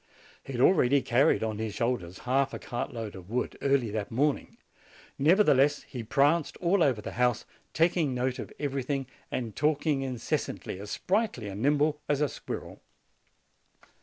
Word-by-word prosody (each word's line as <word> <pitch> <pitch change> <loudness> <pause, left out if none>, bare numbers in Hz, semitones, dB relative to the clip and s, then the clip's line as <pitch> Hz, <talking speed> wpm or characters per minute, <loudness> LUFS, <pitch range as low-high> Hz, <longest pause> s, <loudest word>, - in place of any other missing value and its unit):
He 135 - -8
had 120 - -1
already 140 -6 +4
carried 130 +1 +3
on 110 -1 -2
his 110 -2 -3
shoulders 110 -8 -2
half 135 +2 +1
a - - -3
cartload 115 -3 -5
of 95 -1 -11
wood, 125 +3 -2
early 135 -5 +2
that 105 +1 -3
morning; 140 +5 0 0.6
nevertheless, 145 -3 +4
he 125 - -7
pranced 145 +8 +2
all 180 +2 +2
over 125 -9 +2
the - - -5
house, 125 -2 +2 0.3
taking 165 -4 +2
note 125 0 -1
of - - -6
everything 140 -1 -2 0.2
and 115 -4 -4
talking 150 -1 +1
incessantly, 125 -6 -3
as 100 +1 -8
sprightly 190 - -1
and 100 +2 -6
nimble 150 +2 +2
as 145 -1 +2
a 150 -1 +2
squirrel. - - -7
135 Hz, 155 wpm, -28 LUFS, 115-150 Hz, 0.6 s, already